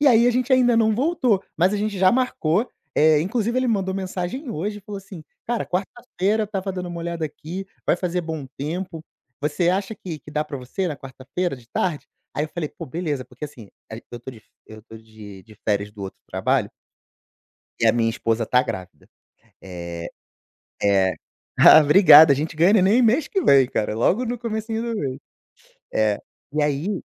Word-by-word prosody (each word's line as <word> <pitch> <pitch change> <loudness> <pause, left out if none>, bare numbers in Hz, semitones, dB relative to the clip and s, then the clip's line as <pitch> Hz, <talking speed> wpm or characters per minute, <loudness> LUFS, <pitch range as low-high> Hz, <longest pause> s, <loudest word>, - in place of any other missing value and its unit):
E 290 - +3
aí 235 -2 +6
a - - +5
gente 255 +2 0
ainda 245 -2 +4
não 220 -1 +3
voltou, 250 - +1
mas 180 +4 +3
a - - 0
gente 205 -1 -2
já 185 0 +5
marcou, 235 -5 +1 0.3
eh, 155 -1 +5
inclusive, 230 +6 -1
ele 255 - +1
mandou 190 -4 0
mensagem 190 - -4
hoje 205 +4 -3
e - - -15
falou 200 0 -7
assim: 190 -4 -11 0.2
"Cara, 240 -1 -1
quarta-feira 210 +2 -1
estava 195 -2 -4
dando 180 -1 -5
uma 175 -1 -6
olhada 170 -1 -3
aqui, 170 +6 -7 0.2
vai - - +3
fazer 180 -1 -2
bom 160 -4 -5
tempo, 165 +3 -5 0.4
você 155 +4 0
acha 195 +3 -1
que 165 -6 -7
que 150 - -13
dá 150 +1 -1
pra 140 - -6
você 130 +9 -4
na 150 - -4
quarta-feira 135 +5 -4
de 120 -1 -18
tarde?" 170 -5 -2 0.3
Aí 150 - 0
eu - - -7
falei: 160 -4 -2
"Pô - - -9
beleza". 150 -3 -3
Porque, 140 - -9
assim, 120 -8 -11 0.2
a - - -5
eu 120 -1 -8
tô 130 - -8
de 115 - -13
f - - -27 0.2
eu 110 -1 -12
tô 110 0 -13
de 110 -3 -13
de 110 -1 -17
férias 105 -1 0
do 105 -2 -10
outro 95 - -8
trabalho - - 0 1.1
e - - +3
a - - +6
minha 115 -1 +1
esposa 115 0 -1
tá 125 0 +3
grávida, 90 -5 -7 0.5
eh 85 -2 -7 0.7
é. 95 -3 +3 0.4
Ah - - +9
obrigada! 155 -1 +8
A - - +2
gente 155 +2 -3
ganha 175 +6 +5
neném 215 +4 +4
mês 255 +6 +3
que 390 - 0
vem 135 -2 +6
cara, 105 0 -1
logo 190 - +2
no 240 0 -3
comecinho 225 -1 -3
do 230 -1 -3
mês, 130 -2 -3 0.7
é. 105 -1 +1 0.3
E 150 0 0
aí, 150 +7 -1
170 Hz, 195 wpm, -23 LUFS, 130-210 Hz, 1.1 s, Ah